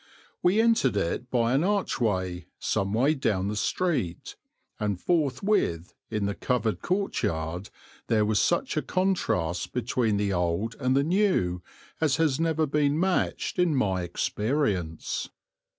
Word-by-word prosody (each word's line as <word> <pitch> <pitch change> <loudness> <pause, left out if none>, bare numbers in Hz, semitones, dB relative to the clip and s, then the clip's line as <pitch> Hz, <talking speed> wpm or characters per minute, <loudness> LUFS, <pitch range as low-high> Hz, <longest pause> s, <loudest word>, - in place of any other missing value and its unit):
We 185 +5 +3
entered 225 - +3
it 100 +7 -2
by 120 -1 +2
an 140 +4 +3
archway 95 - -1
some 100 -2 -1
way 130 +7 +3
down 100 -9 0
the 105 - -3
street, 105 - -1 0.4
and 100 -3 -1
forthwith, 140 - 0 0.2
in 105 -2 -1
the 100 - -1
covered 115 -1 -1
courtyard, 90 - -2 0.4
there 110 -2 +3
was 105 -1 +2
such 175 +10 +1
a 155 - +1
contrast 145 - -1
between 120 -3 0
the 100 -1 0
old 90 +6 0
and 130 0 +2
the 140 - +3
new 165 - +1 0.4
as 150 -4 +3
has 160 -4 +1
never 160 -1 +1
been 145 +1 +1
matched 185 0 0
in 175 -4 +3
my 95 -8 +1
experience. 95 - -1
120 Hz, 135 wpm, -27 LUFS, 95-160 Hz, 0.4 s, We